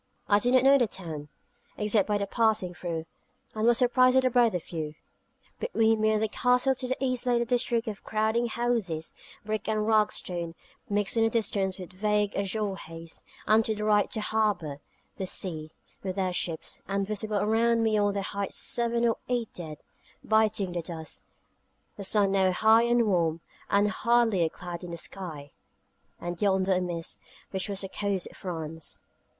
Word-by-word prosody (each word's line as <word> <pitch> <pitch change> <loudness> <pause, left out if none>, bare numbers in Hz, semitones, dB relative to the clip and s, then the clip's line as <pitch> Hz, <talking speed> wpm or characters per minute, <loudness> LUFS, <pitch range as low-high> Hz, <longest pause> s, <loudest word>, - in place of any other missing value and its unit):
I 205 0 +5
did 245 +4 +2
not 255 - +5
know 275 +1 +6
the 240 - +3
town, 160 -7 -7 0.5
except 210 -1 +2
by 210 -1 +2
passings 205 -3 +1
through, 165 -1 -4 0.5
and 220 +1 0
was 240 -1 +5
surprised 255 +1 +4
at 260 - +4
the 255 - +2
breadth 235 -4 +4
of 175 - -2
view. 155 -3 -5 0.6
Between 225 - +2
me 215 - +4
and 215 0 +2
the - - +2
Castle 250 +4 +2
to 255 0 -5
the 260 - -1
east 255 -2 -1
lay 245 -1 +3
the 235 - +1
district 240 -1 0
of 210 -3 -5
crowding 220 +2 +1
houses, 225 -9 -1 0.3
brick 215 0 -2
and 215 -1 +1
ragstone, 185 -6 +1 0.3
mixed 205 +2 0
in 225 - +4
the 225 - +4
distance 200 -4 0
with 185 -1 -9
vague 210 +1 0
azure 200 +1 -1
haze; 165 -1 -9 0.2
and 220 +2 +5
to 220 0 -1
the 210 - -4
right 210 -1 +3
the 220 - -3
harbour, 210 -10 0 0.4
the 190 - -3
sea, 160 -5 -3 0.3
with 190 -1 -4
their 185 -2 0
ships; 165 -2 -3
and 200 0 0
visible 215 +1 -2
around 225 +3 +2
me 220 -1 +2
on 205 -1 +2
the 200 -1 -2
heights 200 0 -3
seven 235 0 +1
or 230 - +1
eight 240 -3 -1
dead, 155 -4 -8 0.4
biting 220 -3 +2
the 175 -1 -2
dust; 160 -2 -7 0.7
the 200 - -7
sun 200 0 +3
now 190 -1 +3
high 220 +4 +5
and 235 0 +3
warm, 170 -5 +1 0.3
with 200 +1 +4
hardly 235 -5 +2
a 160 - +1
cloud 175 +1 -7
in 175 - -6
the 170 - -5
sky; 160 -6 -6 0.7
and 175 0 -5
yonder 190 -1 +2
a 185 - +1
mist, 170 -2 -3 0.3
which 190 +1 -2
was 200 -1 -3
the 195 - -4
coast 200 -3 -1
of - - -17
France. 160 -3 -5
205 Hz, 185 wpm, -28 LUFS, 180-225 Hz, 0.7 s, know